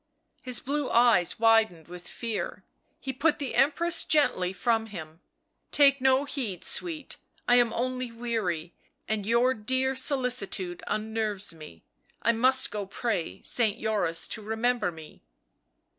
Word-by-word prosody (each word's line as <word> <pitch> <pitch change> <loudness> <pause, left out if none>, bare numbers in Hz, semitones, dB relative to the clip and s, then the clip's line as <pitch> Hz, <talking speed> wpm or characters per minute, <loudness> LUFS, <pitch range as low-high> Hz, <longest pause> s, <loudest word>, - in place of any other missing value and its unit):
His 255 -2 -3
blue 285 +1 -3
eyes 230 -7 +3
widened 220 -7 +2
with 175 0 -10
fear, 230 -3 -5 0.4
he 265 - -5
put 295 +5 +1
the 280 -3 -4
Empress 335 +5 +2
gently 185 -12 +1
from 225 +3 -1
him. 160 -5 -10 0.2
" - - -50
Take 275 -2 +5
no 265 +1 +3
heed, 245 - -4
sweet, 320 -6 +3 0.3
I 245 - +5
am 240 -2 +3
only 255 0 -3
weary 215 -9 -3 0.3
and 210 -2 -2
your 240 +3 +3
dear 260 +4 -1
solicitude 250 - 0
unnerves 215 -3 -2
me 155 - -13 0.2
— - - -35
I 235 - +4
must 260 +3 +3
go 205 -2 -5
pray 195 - -4
Saint 225 -3 +2
Joris 200 -7 0
to 220 - -5
remember 220 -1 -1
me." 160 -2 -14
230 Hz, 145 wpm, -27 LUFS, 195-260 Hz, 0.4 s, Take